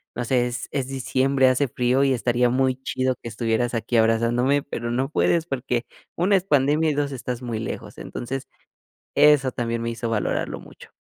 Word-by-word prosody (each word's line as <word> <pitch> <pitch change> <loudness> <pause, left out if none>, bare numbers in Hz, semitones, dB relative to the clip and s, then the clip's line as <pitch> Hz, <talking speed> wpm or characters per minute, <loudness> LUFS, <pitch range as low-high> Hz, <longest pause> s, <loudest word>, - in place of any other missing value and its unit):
no 120 - -2
sé, 125 0 +2
es, 120 0 -5
es 135 -2 -2
diciembre, 135 0 +2
hace 135 +2 +2
frío 125 +2 +1
y 135 - +3
estaría 120 +1 +1
muy 130 +1 +2
chido 130 0 0
que - - -7
estuvieras 115 +1 -1
aquí 115 +1 0
abrazándome, 120 +5 +2
pero, 120 -4 -5
no 130 +4 0
puedes 165 +1 +2
porque, 125 -4 -2 0.3
1 190 +4 +3
es 185 - -3
pandemia, 150 0 +2
y - - -1
2, 145 -1 -1
estás 125 -1 -5
muy 115 -3 -3
lejos". 110 - -6
Entonces, 135 +3 -5 0.7
eso 145 -3 +5
también 115 -1 -2
me 115 - -2
hizo 115 0 -4
valorarlo 110 -2 -1
mucho. - - -15
125 Hz, 185 wpm, -23 LUFS, 120-135 Hz, 0.7 s, eso